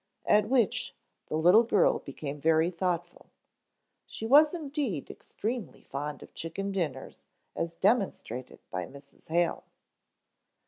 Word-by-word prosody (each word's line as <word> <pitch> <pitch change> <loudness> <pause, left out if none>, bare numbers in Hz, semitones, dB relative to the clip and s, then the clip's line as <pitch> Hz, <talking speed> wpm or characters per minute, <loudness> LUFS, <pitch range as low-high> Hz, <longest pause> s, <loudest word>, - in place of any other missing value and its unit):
At 210 0 +4
which 245 -6 +1 0.3
the 155 - -1
little 180 +7 +7
girl 215 -5 +3
became 140 +1 -7
very 160 +2 +3
thoughtful. 175 -1 -3 0.8
She 220 - -6
was 295 +6 +7
indeed 285 - -3
extremely 225 -3 -5
fond 145 0 -5
of - - -15
chicken 195 +5 -4
dinners 155 -9 -4 0.3
as 165 0 -3
demonstrated 190 - 0
by 90 -1 -3
Mrs. 140 0 -15
Hale. 170 +1 +1
175 Hz, 120 wpm, -29 LUFS, 150-220 Hz, 0.8 s, little